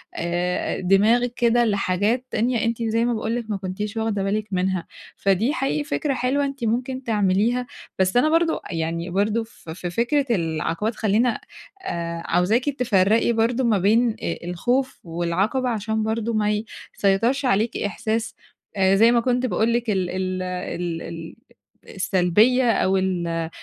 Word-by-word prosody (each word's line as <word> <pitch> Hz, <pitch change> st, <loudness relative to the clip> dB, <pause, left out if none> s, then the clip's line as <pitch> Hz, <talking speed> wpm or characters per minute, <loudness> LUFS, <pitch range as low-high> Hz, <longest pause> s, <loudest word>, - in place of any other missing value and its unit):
آآ 175 Hz, +1 st, -1 dB
دماغِك 220 Hz, +6 st, +3 dB
كده 240 Hz, 0 st, +3 dB
لحاجات 205 Hz, +3 st, 0 dB
تانية 235 Hz, 0 st, 0 dB
أنتِ 230 Hz, 0 st, -1 dB
زي 230 Hz, +1 st, +1 dB
ما 240 Hz, -, +1 dB
باقول 220 Hz, +1 st, -2 dB
لِك 230 Hz, -2 st, -4 dB
ما 205 Hz, -, -1 dB
كنتيش 200 Hz, +3 st, -5 dB
واخدة 220 Hz, -3 st, -1 dB
بالِك 210 Hz, +2 st, -1 dB
منها 185 Hz, -1 st, -1 dB, 0.3 s
فدي 200 Hz, +8 st, +1 dB
حقيقي 290 Hz, 0 st, -1 dB
فكرة 290 Hz, -1 st, -1 dB
حلوة 265 Hz, +3 st, 0 dB
أنتِ 275 Hz, -2 st, -5 dB
ممكن 255 Hz, +4 st, -1 dB
تعمليها. 220 Hz, +3 st, +1 dB, 0.3 s
بس 185 Hz, +4 st, +2 dB
أنا 300 Hz, +5 st, +4 dB
برضه 330 Hz, +1 st, +2 dB
أ -, -, -4 dB
يعني 165 Hz, +2 st, -2 dB
برضه 210 Hz, +5 st, 0 dB
في 170 Hz, -7 st, -11 dB
في 180 Hz, -1 st, -5 dB
فكرة 245 Hz, -, +1 dB
العقبات 165 Hz, +6 st, -2 dB
خلّينا 225 Hz, +3 st, +1 dB, 0.4 s
آآ 170 Hz, -, -4 dB
عاوزاكِ 220 Hz, +10 st, +2 dB
تفرّقي 230 Hz, -4 st, +2 dB
برضه 230 Hz, +3 st, +1 dB
ما 230 Hz, -4 st, +3 dB
بين 225 Hz, +6 st, +3 dB
أ 170 Hz, -, -3 dB
الخوف 245 Hz, +10 st, -1 dB
والعقبة 175 Hz, +9 st, -1 dB
عشان 220 Hz, -1 st, -1 dB
برضه 225 Hz, +1 st, -1 dB
ما 210 Hz, -1 st, +1 dB
ي 210 Hz, +1 st, -2 dB, 0.3 s
سيطرش 230 Hz, +8 st, +1 dB
عليكِ 225 Hz, -1 st, +1 dB
إحساس 220 Hz, +2 st, -2 dB, 0.4 s
آآ 190 Hz, -1 st, +3 dB
زي 225 Hz, +4 st, +6 dB
ما 240 Hz, -, +4 dB
كنت 250 Hz, +1 st, 0 dB
باقول 230 Hz, -1 st, +1 dB
لِك 235 Hz, -1 st, -1 dB
ال 185 Hz, -3 st, 0 dB
ال 185 Hz, 0 st, -2 dB
ال 180 Hz, -2 st, -4 dB
ال 165 Hz, -1 st, -8 dB, 0.6 s
السلبيّة 210 Hz, +7 st, +3 dB
أو 190 Hz, -2 st, +2 dB
ال 185 Hz, -2 st, -1 dB
آآ 165 Hz, -1 st, -2 dB
215 Hz, 160 wpm, -23 LUFS, 185-240 Hz, 0.6 s, زي